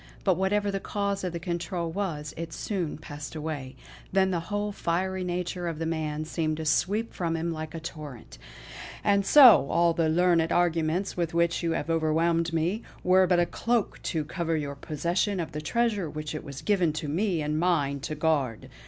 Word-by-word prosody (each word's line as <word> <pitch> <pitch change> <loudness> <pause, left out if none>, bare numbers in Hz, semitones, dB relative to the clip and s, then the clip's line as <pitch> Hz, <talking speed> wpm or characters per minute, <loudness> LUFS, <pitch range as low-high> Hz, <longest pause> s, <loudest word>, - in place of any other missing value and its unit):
But 190 -3 +3
whatever 200 +2 +1
the 195 - -2
cause 200 0 -2
of 180 - -1
the 170 - -4
control 170 -1 -3
was, 160 -6 -3
it 165 0 -6
soon 180 -7 -3
passed 150 0 -8
away; 150 -4 -5 0.4
then 190 0 +3
the 175 - 0
whole 205 0 -1
fiery 185 0 -1
nature 180 0 -3
of 165 -2 -3
the 165 - -3
man 155 -1 -2
seemed 155 -1 -1
to 160 - -4
sweep 205 +8 +1
from 165 -2 -1
him 170 +1 -2
like 155 0 -6
a - - -4
torrent: 150 -7 -9 0.6
"And 200 -1 +3
so 240 - +8
all 170 0 +3
the 165 -1 +1
learned 170 0 +3
arguments 175 +2 +1
with 170 -2 -2
which 170 0 +2
you 165 -1 0
have 165 +1 -2
overwhelmed 165 +1 +1
me, 170 +7 0 0.2
were 185 +1 +5
but 175 -1 +3
a 175 - +4
cloak 230 +3 -1
to 160 -3 -2
cover 165 0 -1
your 145 -2 -3
possession 170 +7 -1
of 165 - -3
the 150 - -5
treasure 210 -1 0
which 155 0 -5
it 155 - -5
was 140 -1 -8
given 185 -7 +2
to 155 0 -4
me 170 +1 0
and 150 +1 -1
mine 145 -5 +1
to 155 +3 -4
guard. 145 -7 0
170 Hz, 195 wpm, -27 LUFS, 155-185 Hz, 0.6 s, so